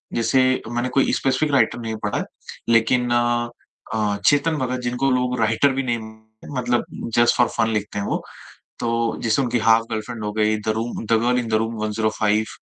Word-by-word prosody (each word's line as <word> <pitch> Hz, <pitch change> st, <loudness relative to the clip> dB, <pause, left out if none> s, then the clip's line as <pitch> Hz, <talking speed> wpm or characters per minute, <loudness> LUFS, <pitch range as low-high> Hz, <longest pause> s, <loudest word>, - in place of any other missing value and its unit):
जैसे 130 Hz, +2 st, +2 dB
मैंने 120 Hz, +1 st, -1 dB
कोई 135 Hz, -, +3 dB
स्पेसिफिक 135 Hz, +3 st, +1 dB
राइटर 135 Hz, -3 st, +2 dB
नहीं 110 Hz, -1 st, -4 dB
पढ़ा 105 Hz, -, -1 dB
है। -, -, -1 dB, 0.5 s
लेकिन 120 Hz, +2 st, +3 dB
अ, 120 Hz, -3 st, -2 dB
चेतन 150 Hz, +2 st, +3 dB
भगत 130 Hz, -2 st, -2 dB
जिनको 125 Hz, +3 st, 0 dB
लोग 125 Hz, -1 st, 0 dB
राइटर 115 Hz, +5 st, +3 dB
भी 135 Hz, +1 st, -1 dB
नहीं 120 Hz, -2 st, -1 dB
मानते, 110 Hz, 0 st, -14 dB
मतलब 120 Hz, -1 st, 0 dB, 0.3 s
जस्ट 120 Hz, 0 st, +4 dB
फॉर 120 Hz, -, +4 dB
फन 115 Hz, -1 st, +2 dB
लिखते 105 Hz, -1 st, -2 dB
हैं 100 Hz, -, -3 dB
वो। -, -, -2 dB, 0.6 s
तो 115 Hz, -1 st, 0 dB
जैसे 115 Hz, +4 st, +2 dB
उनकी 120 Hz, -1 st, 0 dB
'हाफ 115 Hz, 0 st, +4 dB
गर्लफ्रेंड' 110 Hz, +1 st, -4 dB
हो 105 Hz, -, -2 dB
गई, 110 Hz, 0 st, +1 dB
द 105 Hz, -, -7 dB
रु 110 Hz, -, -1 dB, 0.2 s
'the 115 Hz, -, -2 dB
girl 125 Hz, +1 st, +2 dB
in 120 Hz, -, -2 dB
the 110 Hz, -, -1 dB
room 115 Hz, +1 st, -4 dB
105' 110 Hz, 0 st, 0 dB
115 Hz, 190 wpm, -22 LUFS, 110-125 Hz, 0.6 s, जस्ट